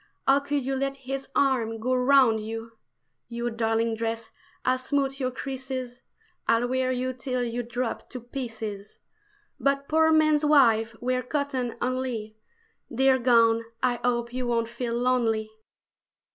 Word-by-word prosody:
How 270 +1 +5
could 285 -1 -2
you 270 0 -1
let 275 +1 -1
his 270 +1 -4
arm 235 -5 +1
go 255 +3 0
round 255 -3 +5
you? 225 +1 -6 0.6
You 235 0 -3
darling 225 0 0
dress 225 0 -3 0.3
I'll 255 0 +2
smooth 275 +1 -1
your 255 -2 0
creases, 260 -1 -5 0.5
I'll 230 +1 +3
wear 255 0 0
you 255 0 -1
till 255 0 -2
you 240 0 -2
drop 240 0 -4
to 250 - -6
pieces; 225 -5 -6 0.6
But 275 0 +1
poor 320 0 +4
men's 310 -1 +4
wives 230 -7 +4
wear 255 +1 0
cotton 260 -2 -2
only 250 -4 -2 0.6
Dear 265 +1 +3
gown 230 -2 +4 0.2
I 245 -1 +2
hope 240 -1 0
you 255 -1 -2
won't 230 -1 0
feel 235 0 -3
lonely! 235 -3 +1
250 Hz, 145 wpm, -26 LUFS, 230-265 Hz, 0.6 s, How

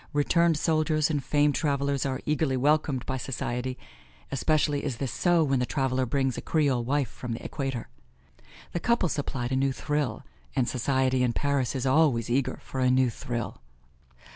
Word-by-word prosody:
Returned 165 +2 +3
soldiers 155 -1 +1
and 145 -3 -1
famed 145 +1 +2
travelers 140 -2 0
are 130 -1 -3
eagerly 150 -3 +1
welcomed 145 -1 +1
by 130 - -2
society; 125 0 -3 0.5
especially 145 +1 +1
is 130 -5 -2
this 135 -1 -3
so 175 -2 +3
when 135 -3 +1
the 125 - +1
traveler 130 -2 0
brings 135 0 0
a - - -6
Creole 140 -6 +1
wife 140 +2 0
from 120 +1 -6
the 115 - -7
Equator. 135 -5 -3 0.8
The 175 - -2
couple 235 -3 +2
supplied 135 -4 -3
a - - +1
new 135 +1 +2
thrill, 145 -4 -2 0.3
and 125 -2 +2
society 130 0 +1
in 125 -2 +2
Paris 140 -2 0
is 130 0 -2
always 130 -5 +3
eager 135 +1 0
for 130 - -6
a 130 0 +3
new 130 -1 +3
thrill. 120 - -5
135 Hz, 170 wpm, -27 LUFS, 125-150 Hz, 0.8 s, Returned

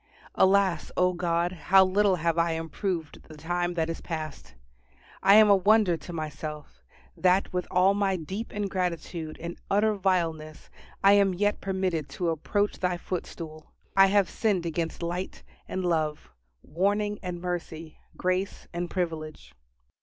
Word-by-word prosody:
Alas! 190 -3 +3
O 180 0 +3
God, 175 0 0
how 185 +3 +4
little 195 +1 +3
have 170 -1 0
I 165 0 +2
improved 165 +1 -4
the 155 - -12
time 175 +2 -2
that 160 -2 0
is 165 - -5
past! 155 - -6 0.7
I 195 +1 +6
am 215 0 +8
a 200 - +7
wonder 200 -1 +4
to 165 +2 -9
myself, 155 -2 -6 0.3
that 185 +1 +2
with 180 0 -2
all 185 +2 +4
my 200 -1 +1
deep 190 +7 -5
ingratitude 180 -5 -3
and 170 +1 -7
utter 210 +2 +3
vileness 165 -6 -2 0.3
I 195 - +7
am 200 -2 +4
yet 205 +3 0
permitted 185 -6 -2
to 175 -2 0
approach 205 +6 -1
Thy 180 -1 0
footstool: 165 -3 -7 0.2
I 195 0 +7
have 200 -1 +3
sinned 195 -5 0
against 165 0 -3
light 175 +2 -4 0.2
and 185 -1 -3
love 155 -3 -1 0.3
warning 205 +6 0
and 180 -2 -5
mercy 165 -3 -5 0.2
grace 185 +2 -1
and 175 0 -3
privilege. 155 - -4
180 Hz, 145 wpm, -27 LUFS, 165-195 Hz, 0.7 s, am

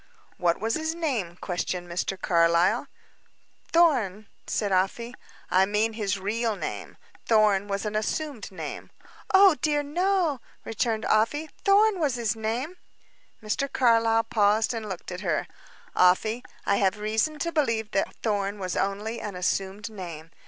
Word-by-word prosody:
"What 170 -2 +1
was 225 +3 -1
his 315 +3 -1
name?" 240 - -2
questioned 180 -1 -3
Mr. 180 +2 -3
Carlyle. 170 +7 +3 0.8
"Thorn," 245 - +3 0.2
said 205 -2 -1
Afy. 195 +6 0 0.4
"I 190 +1 +4
mean 215 +2 +1
his 205 -3 -1
real 220 +3 -1
name. - - -6 0.3
Thorn 210 -3 +3
was 200 +1 -3
an 210 0 -3
assumed 235 +1 -3
name." 160 -5 -7 0.4
"Oh, 385 -1 +7
dear 295 -1 +1
no," 345 -2 0 0.2
returned 225 0 -1
Afy. 290 +9 +1
"Thorn 405 0 +4
was 290 -6 +1
his 230 -3 -1
name." 235 +10 -3 0.7
Mr. 265 +6 -2
Carlyle 230 -3 +3
paused 215 +1 +2
and 220 -2 -5
looked 185 -1 -6
at 180 +1 -6
her. 170 -6 0 0.5
"Afy, 215 +6 +3 0.2
I 200 - +2
have 195 +1 +2
reason 220 +9 0
to 335 +3 -2
believe 230 -9 0
that 195 - -1
Thorn 205 -2 -1
was 185 -3 -3
only 210 +4 -2
an 205 -3 -5
assumed 195 +4 -2
name. 165 -5 -8
215 Hz, 145 wpm, -26 LUFS, 195-250 Hz, 0.8 s, Oh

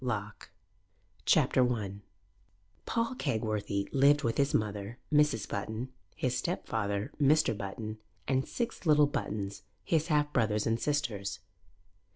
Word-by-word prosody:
LOCKE 110 -4 -4 0.8
CHAPTER 125 -1 +4
I 100 -3 -5 0.9
PAUL 230 +2 0
KEGWORTHY 110 - -1
lived 140 +2 +5
with 115 -1 0
his 140 0 +3
mother, 105 +1 -1 0.2
Mrs. 150 -8 +3
Button, 110 +5 -4 0.3
his 125 -1 -1
stepfather, 110 - -2
Mr. 150 -3 +4
Button, 110 +2 -5 0.3
and 130 0 +1
six 235 -6 -3
little 150 -1 +6
Buttons, 100 -8 -3 0.2
his 160 -1 +1
half 150 -2 +1
brothers 105 -4 +2
and 115 0 +1
sisters. 110 -11 -1
115 Hz, 120 wpm, -31 LUFS, 105-145 Hz, 0.9 s, little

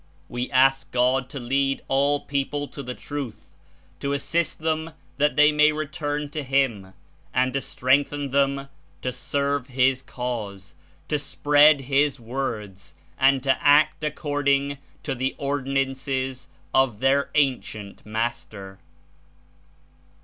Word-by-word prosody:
We 120 +1 -3
ask 135 0 +3
God 125 +1 +2
to 140 -1 -6
lead 135 +2 0
all 140 +2 +2
people 145 +1 -2
to 140 - -7
the 125 -2 -6
Truth, 145 -6 -7 0.5
to 140 0 -2
assist 160 +3 -1
them 160 0 -2 0.2
that 150 +1 +2
they 150 +1 +6
may 150 0 +5
return 150 -1 -3
to 150 - -3
him, 130 -9 0 0.4
and 130 0 +2
to 135 - 0
strengthen 140 +2 +1
them 140 0 +1 0.4
to 125 - -1
serve 140 +1 -1
his 130 0 +2
Cause, 110 -7 -5 0.3
to 150 - 0
spread 145 0 +4
his 140 +1 +1
Words 110 - -5 0.2
and 135 0 +4
to 135 -1 +1
act 155 +2 +4
according 140 -2 0 0.2
to - - -2
the 130 +1 -2
Ordinances 135 -1 -2 0.3
of 130 -6 +2
their 135 +2 +2
Ancient 125 -8 -1
Master." 105 -3 -4
135 Hz, 125 wpm, -24 LUFS, 125-145 Hz, 0.5 s, they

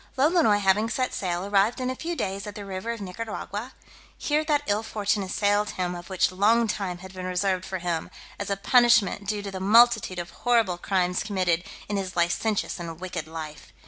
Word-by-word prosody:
Lolonois 295 - +4
having 205 +2 +2
set 255 +1 -1
sail, 180 -1 -2
arrived 205 +5 +2
in 255 0 -1
a - - -4
few 340 +5 -4
days 200 -5 -3
at 205 - -7
the 205 -2 -7
river 195 +3 -5
of 230 -2 -3
Nicaragua: 215 +4 -5 0.4
here 300 +1 +1
that 295 -2 +2
ill 205 +1 +1
fortune 210 -2 -1
assailed 205 +2 +1
him 180 -1 -1
which 180 +2 0
of 185 - -13
long 230 +3 +4
time 195 -4 -2
had 190 - -11
been 185 -1 -5
reserved 185 0 0
for 190 - -3
him, 170 -2 -2 0.3
as - - -4
a 200 - 0
punishment 235 -3 +4
due 205 0 -2
to 200 - -5
the 190 - -5
multitude 220 -1 +5
of 175 0 -5
horrible 230 -8 +1
crimes 180 -1 0
committed 185 -5 0 0.2
in 205 - -2
his 190 -1 -4
licentious 180 +4 0
and 165 -1 -6
wicked 175 -4 -5
life. 155 -1 -8
200 Hz, 200 wpm, -26 LUFS, 185-225 Hz, 0.4 s, multitude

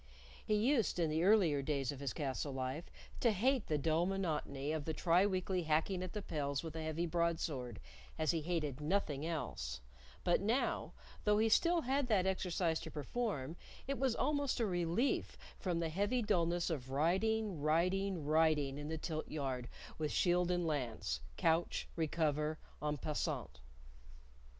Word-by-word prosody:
He 215 - +1
used, 230 0 +2
in 165 -3 +1
the 160 +2 +1
earlier 180 -8 +5
days 140 -2 -1
of 140 - -8
his 140 -2 -2
castle 140 -1 -2
life, 130 +5 -3 0.3
to 240 - +4
hate 245 +4 +2
the 155 - +1
dull 160 +4 +2
monotony 155 -7 -2
of 155 -2 -2
the 160 - -2
tri 180 +3 +4
weekly 185 -1 0
hacking 165 +4 +1
at 185 -1 -5
the 210 -2 -4
pels 140 -2 -2
with 160 -1 -6
a 160 - -3
heavy 160 +2 -1
broadsword 160 - -1 0.4
as 155 - +2
he 165 -2 -1
hated 155 -4 -2
nothing 155 -3 0
else; 65 - -3 0.4
but 175 - +3
now, 230 +7 0 0.3
though 210 0 +4
he 220 +1 +3
still 340 +8 +4
had 270 0 0
that 200 -6 +3
exercise 180 -3 0
to 160 - -7
perform, 160 - -3 0.3
it 275 0 -2
was 260 -3 +2
almost 285 -2 +1
a 230 - +2
relief 175 +6 0 0.2
from 175 -3 -1
the 165 -1 0
heavy 205 +9 +1
dulness 175 -4 +1
of 130 -5 -3
riding, 190 +5 +1
riding, 180 +2 +1
riding 150 -3 +3
in 145 - -5
the 160 - -2
tilt 155 0 -3
yard 130 -5 -3 0.3
with 150 -2 -1
shield 180 0 +3
and 175 -1 +1
lance 120 - -2 0.2
couch 165 +1 +1
recover 155 -1 0 0.2
en 150 0 -1
passant. 150 +2 -3
165 Hz, 165 wpm, -36 LUFS, 150-195 Hz, 0.4 s, earlier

